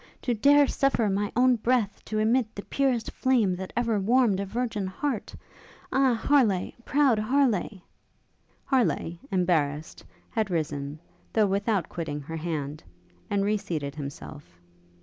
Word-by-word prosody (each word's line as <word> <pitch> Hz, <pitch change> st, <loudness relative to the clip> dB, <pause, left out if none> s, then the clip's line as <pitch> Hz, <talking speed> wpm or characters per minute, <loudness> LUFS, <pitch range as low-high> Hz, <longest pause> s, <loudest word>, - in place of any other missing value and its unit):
to 245 Hz, -, -1 dB
dare 285 Hz, +6 st, +5 dB
suffer 260 Hz, -6 st, +1 dB
my 200 Hz, +1 st, -1 dB
own 250 Hz, +1 st, +5 dB
breath 230 Hz, -3 st, 0 dB
to 215 Hz, -, -4 dB
emit 225 Hz, +1 st, +1 dB
the 200 Hz, -, -6 dB
purest 260 Hz, -5 st, 0 dB
flame 235 Hz, -8 st, +2 dB
that 185 Hz, +1 st, -7 dB
ever 230 Hz, -3 st, +1 dB
warmed 225 Hz, -1 st, +3 dB
a 200 Hz, -, -2 dB
virgin 225 Hz, -2 st, -2 dB
heart? 230 Hz, +4 st, -3 dB, 0.6 s
Ah! 265 Hz, -2 st, +3 dB
Harleigh! 225 Hz, -7 st, +2 dB
proud 270 Hz, -6 st, +3 dB
Harleigh! 215 Hz, -6 st, +1 dB, 0.4 s
' -, -, -40 dB
Harleigh, 225 Hz, -9 st, +1 dB
embarrassed 160 Hz, -6 st, 0 dB, 0.3 s
had 220 Hz, -3 st, -1 dB
risen, 145 Hz, -4 st, -3 dB, 0.4 s
though 220 Hz, -2 st, +4 dB
without 200 Hz, -2 st, 0 dB
quitting 160 Hz, -4 st, -4 dB
her 160 Hz, +3 st, -6 dB
hand, 155 Hz, -3 st, -4 dB, 0.5 s
and 200 Hz, -1 st, +1 dB
re 210 Hz, +1 st, +2 dB
seated 150 Hz, -8 st, -4 dB
himself. 145 Hz, -, -9 dB
205 Hz, 140 wpm, -27 LUFS, 170-245 Hz, 0.6 s, dare